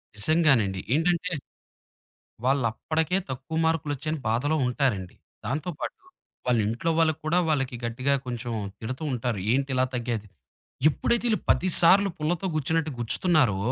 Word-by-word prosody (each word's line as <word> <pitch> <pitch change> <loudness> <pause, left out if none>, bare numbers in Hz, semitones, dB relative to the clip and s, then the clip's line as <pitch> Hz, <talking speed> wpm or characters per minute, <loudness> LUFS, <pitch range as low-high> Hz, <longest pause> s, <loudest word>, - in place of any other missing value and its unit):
నిజంగానండి. 115 - +2 0.2
ఏంటంటే, 175 +2 +1 1.1
వాళ్ళప్పటికే 140 +7 +1
తక్కువ 130 +5 -4
మార్కులొచ్చాయని 155 -1 -1
బాధలో 125 +7 +1
ఉంటారండి. 125 -8 -1 0.3
దాంతో 150 +6 -2
పాటు - - -4 0.5
వాళ్ళ 120 -2 +3
ఇంట్లో 120 +9 -2
వాళ్ళకి 160 -2 +2
కూడా 165 +3 +2
వాళ్ళకి 135 -4 0
గట్టిగా 130 +4 0
కొంచెం 120 -1 -4 0.3
తిడుతూ 130 +6 -5
ఉంటారు. 120 -3 -2
ఏంటిలా 130 0 +1
తగ్గేది 115 -3 -3 0.6
ఎప్పుడైతే 235 - 0
వీళ్ళు 215 -4 +2
10 185 - +3
సార్లు 195 +4 +6
పుల్లతో 165 +4 -1
గుచ్చినట్టు 155 +1 0
గుచ్చుతున్నారో, 125 - +3
140 Hz, 120 wpm, -26 LUFS, 120-160 Hz, 1.1 s, సార్లు